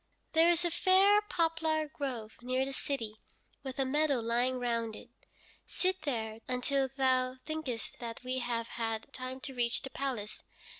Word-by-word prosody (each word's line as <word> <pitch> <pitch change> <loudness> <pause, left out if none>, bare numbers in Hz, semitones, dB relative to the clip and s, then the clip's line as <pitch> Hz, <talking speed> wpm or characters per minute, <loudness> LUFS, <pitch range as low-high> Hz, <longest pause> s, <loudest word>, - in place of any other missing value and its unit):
There 325 +1 +6
is 345 0 +3
a 345 - +1
fair 385 +4 +6
poplar 325 -5 +1
grove 250 -7 -4
near 255 +2 +1
the 275 - -5
city, 225 -7 -3 0.4
with 265 -2 -6
a 270 - +2
meadow 290 0 +2
lying 240 +3 +1
round 230 -3 -1
it. - - -11 0.6
Sit 375 0 0
there 220 -5 -2
until 265 +2 +1
thou 255 -1 +2
thinkest 310 -8 -3
that 230 0 -6
we 255 +1 -1
have 235 -2 -1
had 225 -1 -3
time 255 0 -5
to 285 -2 -5
reach 240 -1 0
the 270 - -5
palace. 250 -7 -3
260 Hz, 160 wpm, -32 LUFS, 235-310 Hz, 0.6 s, There